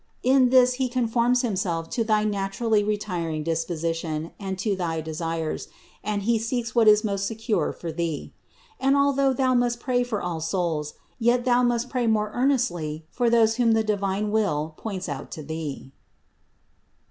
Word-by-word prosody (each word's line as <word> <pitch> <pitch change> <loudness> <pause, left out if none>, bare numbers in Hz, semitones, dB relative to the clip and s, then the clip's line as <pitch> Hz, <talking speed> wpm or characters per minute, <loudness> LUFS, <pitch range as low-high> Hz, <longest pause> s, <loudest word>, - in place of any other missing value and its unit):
In 255 0 +5
this 250 0 +5
He 255 - +1
conforms 245 0 +1
Himself 185 -7 -1
to 230 - 0
thy 215 -1 +2
naturally 205 +1 0
retiring 180 -7 -2
disposition 165 -1 -2
and 190 -2 -4
to 200 +1 0
thy 170 -3 -2
desires, 160 0 -3 0.4
and 205 -1 -2
He 230 +1 +2
seeks 230 0 -2
what 230 -2 +4
is 210 0 +6
most 200 -2 -1
secure 220 -6 -1
for 170 - -6
thee. 165 -2 -3 0.5
And, 270 +1 +3
although 275 -1 +3
thou 260 0 +1
must 240 -1 +1
pray 245 0 +1
for 235 -4 -2
all 175 -3 -3
souls, 160 -3 -2 0.2
yet 240 +1 +2
thou 245 -1 +4
must 240 0 +1
pray 250 -2 -1
more 215 -1 +1
earnestly 175 - 0
for 240 -2 +1
those 225 -1 +4
whom 235 -2 +4
the 220 0 +2
divine 205 0 -1
will 160 -8 0
points 190 -2 -5
out 140 -3 -5
to 155 - -7
thee. 150 -3 -6
210 Hz, 165 wpm, -25 LUFS, 165-240 Hz, 0.5 s, is